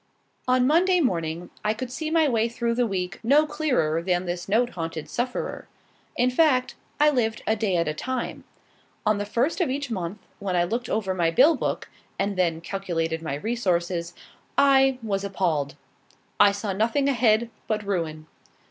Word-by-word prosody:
On 255 0 +3
Monday 355 +6 +4
morning, 170 - -1
I 215 +1 +1
could 245 +2 -5
see 310 +4 -3
my 320 -1 +3
way 230 -3 +1
through 235 0 -1
the 240 0 +1
week 185 -2 -3
no 280 +7 +4
clearer 275 - 0
than 180 0 0
this 175 +1 -4
note 240 +4 +2
haunted 165 -2 -5
sufferer. 245 +1 -3 0.5
In 250 +1 +3
fact, 255 -2 +3 0.3
I 300 0 +6
lived 225 -5 0
a 220 - +2
day 205 -5 0
at 170 - +1
a 150 - 0
time. 255 +10 -4 0.6
On 210 -1 +2
the 205 - -3
first 255 - 0
of 340 - +1
each 275 -1 -3
month, 185 -2 -3 0.2
when 195 -2 -2
I 175 - +3
looked 235 +7 -2
over 200 -3 0
my 170 -3 +1
bill 275 - +5
book, - - -3 0.3
and 200 0 -1
then 170 -3 0
calculated 165 -3 -2
my 155 -4 -3
resources, 175 -3 -1 0.4
I 270 -1 +5
was 200 -3 -1
appalled. 165 -8 -1 0.6
I 205 -1 +7
saw 200 0 -3
nothing 230 +8 +1
ahead 235 -3 +2 0.2
but 215 -1 -1
ruin. 165 -6 -2
215 Hz, 175 wpm, -25 LUFS, 175-255 Hz, 0.6 s, I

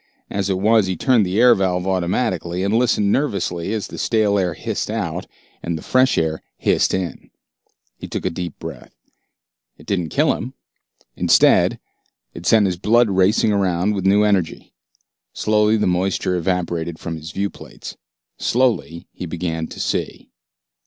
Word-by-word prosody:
As 100 -1 -1
it 95 - +1
was, 105 +1 +3
he 95 - -1
turned 120 -4 +3
the 95 +4 -1
air 125 0 +7
valve 95 -3 0
automatically, 90 -1 -1
and 100 +2 0
listened 110 -4 +2
nervously 100 - -1
as 110 -2 -2
the - - -9
stale 105 -3 +2
air 90 -3 -1
hissed - - -3
out - - -3 0.3
and 85 -1 -3
the 75 - -10
fresh 130 0 +3
air 80 -1 0 0.2
hissed - - +2
in. 95 -2 -5 0.7
He - - -7
took - - -5
a 95 - 0
deep 85 0 -6
breath. - - -9 0.8
It - - -16
didn't 90 -5 -1
kill - - +2
him. 130 +4 -6 0.6
Instead, - - +4 0.5
it 85 - -7
sent 110 -2 +5
his 90 -2 -1
blood 115 +3 +3
racing 95 +4 +3
around 95 0 +1
with 95 -2 -1
new 100 +2 +4
energy. 100 -6 -1 0.6
Slowly 105 0 +2
the 105 - 0
moisture 90 0 0
evaporated 85 -2 -2
from 85 0 -5
his 80 +1 -8
viewplates. 100 +1 -6 0.4
Slowly 115 -9 0
he 90 - -7
began 80 -1 -3
to - - -10
see. - - -3
95 Hz, 160 wpm, -20 LUFS, 90-105 Hz, 0.8 s, air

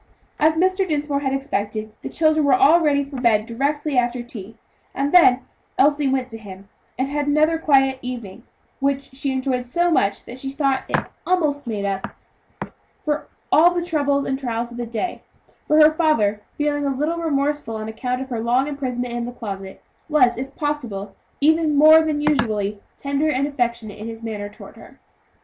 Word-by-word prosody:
As 315 +1 +3
Mr. 375 +2 +2
Dinsmore 295 -3 -1
had 270 -2 -1
expected, 215 -6 -3
the - - -6
children 310 -1 +2
were 285 - +5
all 375 -3 +6
ready 285 -3 +2
for 275 -1 -8
bed 220 -3 +3
directly 280 +4 0
after 240 0 -1
tea; 225 -2 -9 0.4
and 280 +1 -1
then 270 -8 +6 0.4
Elsie 290 +1 +3
went 260 -1 0
to 225 -2 -9
him, 195 -2 -12 0.3
and 260 +2 0
had 290 +1 -2
another 310 +2 +3
quiet 270 -4 +3
evening, 235 -6 -7 0.4
which 275 -1 -1
she 275 0 -2
enjoyed 260 -1 -1
so 345 +7 +1
much 200 -10 +1
that 245 +2 -9
she 270 - -4
thought 275 -1 0
it - - +2 0.3
almost 300 -7 0
made 210 -3 -2
up 195 -1 -3 0.9
for 300 0 -1 0.2
all 345 +3 +5
the 345 -1 -1
troubles 285 -4 0
and 265 0 -2
trials 235 -2 -3
of 240 - -9
the 240 -1 -4
day; 235 +10 -4 0.5
for 305 - +4
her 305 0 +8
father, 225 -11 +1 0.2
feeling 290 -1 0
a 280 - 0
little 300 +5 -1
remorseful 290 -6 -1
on 215 0 -5
account 250 +3 -3
of 265 - -12
her 240 -3 -3
long 245 +3 +2
imprisonment 250 -4 -3
in 240 0 -2
the 245 - -5
closet, 195 -5 -7 0.3
was, 260 -6 +4
if 265 +3 -6
possible, 245 -10 -4 0.3
even 315 0 +3
more 310 +2 +8
than 305 -2 -1
usually 215 -8 0 0.2
tender 280 +2 0
and 275 -1 +1
affectionate 235 -7 -3
in 215 - -6
his 225 0 -8
manner 210 -2 -5
toward 205 - -13
her. - - -15
270 Hz, 185 wpm, -21 LUFS, 235-295 Hz, 0.9 s, her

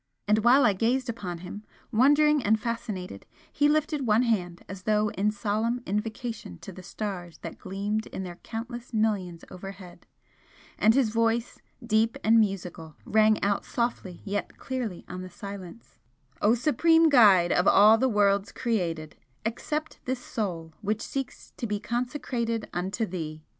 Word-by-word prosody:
And 210 +1 +4
while 245 +5 +5
I 210 - +4
gazed 245 +6 0
upon 185 -6 -4
him, 205 +4 -8 0.3
wondering 290 +5 +4
and 215 +1 +3
fascinated, 205 - -5 0.3
he 290 0 +3
lifted 300 -3 0
one 220 +3 +4
hand 180 -7 -1
as 190 -1 -8
though 210 +1 +2
in 205 +2 +1
solemn 215 +4 -1
invocation 215 - -4
to - - -8
the 185 - -10
stars 185 -3 -6
that - - -7
gleamed 205 +3 -3
in 190 - -6
their 175 -2 -7
countless 240 +3 -7
millions 195 -6 0
overhead, 185 -1 -10 0.7
and 220 +2 +5
his 265 -5 +3
voice, 230 +1 0 0.3
deep 225 0 +2
and 225 +1 +5
musical, 180 -6 -2
rang 215 0 +4
out 200 0 +1
softly 235 -7 -3
yet 205 0 -3
clearly 245 -9 -4
on 185 +1 -6
the 185 - -7
silence: 200 +2 -10 0.4
"O 220 +3 +4
Supreme 325 +5 +4
Guide 205 - +6
of 180 - +2
all 215 +3 +7
the 260 - +2
worlds 200 -2 +2
created, 170 -10 -2 0.3
accept 300 +7 -3
this 260 +1 -1
Soul 175 -10 -4
which 215 +1 -1
seeks 270 -1 -5
to 235 - -3
be 210 -1 -2
consecrated 235 -1 -2
unto 190 +6 -1
Thee! 155 -5 -6
215 Hz, 155 wpm, -27 LUFS, 190-235 Hz, 0.7 s, all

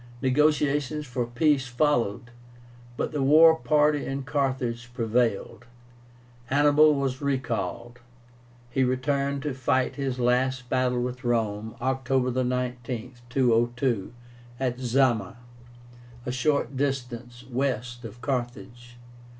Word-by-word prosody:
Negotiations 150 +1 +1
for 125 -2 -3
peace 135 +2 +2
followed, 120 -3 0 0.7
but - - -2
the 150 -3 -2
war 160 +4 +7
party 150 -2 +2
in 135 0 -4
Carthage 125 -2 -2
prevailed. 115 -1 -1 0.8
Hannibal 145 +3 +5
was 135 -1 -2
recalled. 120 -3 -3 0.7
He 130 +1 +2
returned 140 +2 0
to 150 -3 -2
fight 130 +1 0
his 135 -2 -2
last 125 +1 +1
battle 125 -1 +1
with 125 +1 -5
Rome, 110 -2 -1
October 130 0 0
19, 125 -1 -3 0.2
202, 120 -3 +1 0.5
at 125 -2 -1
ZAMA, 120 -5 +1 0.9
a 125 - -2
short 135 0 0
distance 125 -3 -3
west 125 -2 -2
of 115 +1 -10
Carthage. 120 -2 -5
125 Hz, 105 wpm, -26 LUFS, 120-140 Hz, 0.9 s, war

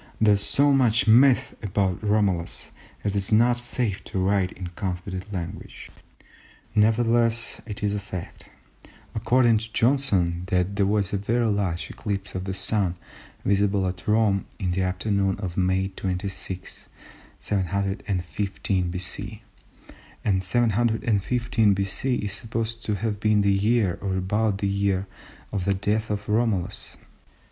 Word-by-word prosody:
There 110 -1 +5
is 100 - +1
so 140 +6 +3
much 115 -6 +4
myth 125 +3 +5
about 95 -3 0
Romulus 95 - 0 0.3
that 105 - 0
it 100 - -3
is 100 0 0
not 120 +2 +4
safe 120 -4 -2
to 100 - -5
write 95 0 +2
in 90 -2 -7
confident 95 +2 -5
language. 90 -4 -7 0.8
Nevertheless 115 +2 +2
it 105 -2 -6
is 105 0 +1
a 105 - -1
fact, 95 -3 -8 0.6
according 115 0 +3
to 110 +1 -8
Johnson, 100 -11 +2
that 95 +1 0
there 100 -1 +2
was 100 -1 0
a - - +2
very 115 +4 0
large 95 -6 -1
eclipse 100 -2 -4
of 95 0 -4
the 95 - -3
Sun 95 -4 0 0.5
visible 100 -1 +2
at 90 0 -6
Rome 105 -2 +2
in 90 -3 -1
the 95 +2 0
afternoon 95 +1 0
of 95 -4 -5
May 95 +1 +1
26, 95 -1 -5 0.5
715 95 -1 -1
B.C., 100 +5 -5 0.8
and 95 -3 +2
715 115 +1 +2
B.C. 100 +7 -1
is 105 -4 -2
supposed 115 +1 -4
to 105 - 0
have 105 0 -2
been 105 0 +3
the 100 0 +3
year, 105 -1 +2
or 95 -2 -1
about 100 +2 0
the 100 - -1
year, 100 -1 0 0.5
of 95 -3 -2
the 100 0 +2
death 105 +3 0
of 105 0 -3
Romulus. 105 -4 -1
100 Hz, 140 wpm, -25 LUFS, 95-110 Hz, 0.8 s, There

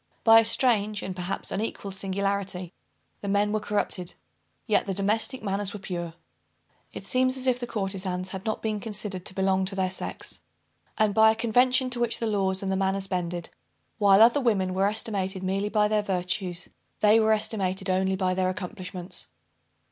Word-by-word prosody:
By 225 0 +8
a - - +4
strange 220 -3 +3
and 185 - -5
perhaps 180 +1 -3
unequalled 200 -2 -3
singularity 195 -2 -2 0.5
the 200 - -6
men 205 +1 +2
were 215 - +1
corrupted, 205 -4 -2 0.5
yet 215 -3 +1
the 195 - -2
domestic 220 +5 0
manners 200 -1 -1
were 205 - -6
pure. 175 -3 -5 0.8
It - - -8
seems 255 +1 +2
as 260 - -3
if 250 -1 +2
the 245 - -4
courtezans 190 -4 -3
had 190 0 -6
not 220 - -3
been 215 -1 -1
considered 205 -3 -5
to 190 - -7
belong 190 0 +2
to 195 +1 -2
their 185 -1 0
sex; 185 - -5 0.6
and, 215 -2 +2
by 220 +1 +6
a 220 - +2
convention 250 +3 +3
to 245 - -1
which 240 -1 +1
the 230 - -2
laws 195 -3 0
and 190 - -1
the - - +1
manners 195 0 0
bended, 175 -2 -3 0.5
while 200 0 +7
other 240 +5 +5
women 195 -7 +1
were 190 +1 +2
estimated 195 -3 -2
merely 195 +2 -1
by 210 -1 +3
their 210 0 +1
virtues, 180 -2 -2 0.3
they 215 +1 +6
were 220 0 +3
estimated 195 -3 0
only 190 0 +1
by 185 -1 0
their 185 0 +1
accomplishments. 185 -1 -6
200 Hz, 180 wpm, -26 LUFS, 190-220 Hz, 0.8 s, By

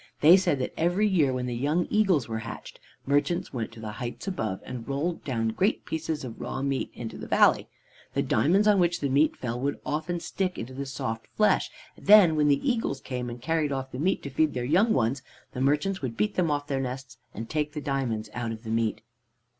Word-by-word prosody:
They 160 +4 +9
said 185 -6 +2
that 130 - -3
every 175 +6 +2
year, 165 -9 +3
when 125 -1 -2
the 125 - -3
young 145 +8 0
eagles 190 - +3
were 110 -1 -3
hatched, 115 0 -8 0.3
merchants 145 +6 0
went 115 -4 -3
to 115 - -12
the 110 -1 -5
heights 120 - -6
above, 110 - -2
and 125 -3 -7
rolled 145 +5 -2
down 115 -5 -1
great 190 - 0
pieces 160 -2 -3
of 120 -3 -7
raw 135 - -4
meat 135 -1 -1
into 115 -2 -7
the - - -7
valley. - - +4 0.5
The - - +2
diamonds 195 +7 +3
on 205 -2 +5
which 175 -1 +2
the 140 - -1
meat 145 +4 +3
fell 120 -1 -3
would 140 +2 -2
often 160 +4 -2
stick 185 +1 -2
into 120 +3 -6
the 140 +1 -5
soft 115 -4 -4
flesh, 215 - +3 0.3
and - - -16
then 200 -6 +8
when 150 -1 +3
the 140 - +2
eagles 225 - 0
came, 125 -2 -4
and 120 +1 -7
carried 155 +2 0
off 135 -1 -3
the 125 - -6
meat 185 +6 0
to 140 - -6
feed 155 +2 +1
their 125 -1 -2
young 190 - +3
ones, 130 - +1 0.3
the 125 - -4
merchants 150 +8 +1
would 120 -4 -4
beat 210 -1 +1
them 175 -3 +1
off 145 -1 -1
their 135 -2 -1
nests, 130 0 -6 0.2
and 115 +1 -5
take 150 +2 -2
the 155 - -3
diamonds 135 -7 -2
out 120 -2 -3
of 110 0 -7
the 110 - -5
meat. 115 -1 0
140 Hz, 225 wpm, -27 LUFS, 125-170 Hz, 0.5 s, They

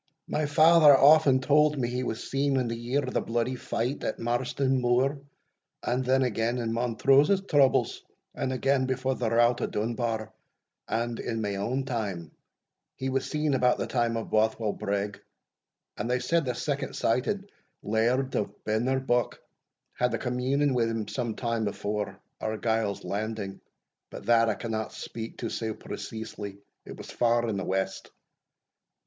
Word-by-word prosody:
My 150 -1 -1
father 155 -1 +7
aften 140 -2 +6
tauld 150 +2 +3
me 125 -3 0
he 125 +1 -2
was 115 -3 -4
seen 140 0 +1
in 125 -2 +1
the 115 - -2
year 120 +5 -1
o' - - -3
the - - 0
bloody 120 +2 -1
fight 125 +2 -3
at - - -2
Marston 130 +2 0
Moor, 125 +4 +2 0.6
and 125 +2 0
then 130 +1 +3
again 120 0 0
in 115 -2 -2
Montrose's 135 - +3
troubles, 140 -3 +3 0.3
and 130 - -2
again 130 0 +1
before 130 0 0
the 120 -3 -1
rout 120 +1 +3
o' - - 0
Dunbar, 110 0 -2 0.5
and, 115 0 -2
in 115 -1 -3
my 105 -2 -1
ain 115 +7 -2
time, 100 - -3 0.6
he 130 - -3
was 135 0 -1
seen 150 -1 0
about 125 -1 +3
the - - -2
time 120 -2 0
o' 115 - -3
Bothwell 110 0 +1
Brigg, 100 0 -3 0.8
and 110 +3 -3
they 125 - +2
said 165 +6 +1
the 125 -2 -2
second 140 +1 -3
sighted 195 - 0 0.3
Laird 120 +5 +1
of 105 - -3
Benarbuck 120 +3 0 0.6
had 125 0 0
a - - -1
communing 130 +3 0
wi' 120 -2 +2
him 115 -2 -3
some 120 -3 -3
time 115 -3 -1
afore 100 +1 -3 0.2
Argyle's 110 -1 -1
landing, 105 -1 -4 0.5
but - - -9
that 115 -1 +4
I 105 - 0
cannot 110 -2 -4
speak 115 0 -7
to 115 - -3
sae 110 -1 -2
preceesely 105 -3 -7 0.3
it - - -9
was - - -9
far 120 0 +2
in 105 -3 -1
the 95 - -2
west. 95 0 -2
120 Hz, 160 wpm, -28 LUFS, 110-130 Hz, 0.8 s, father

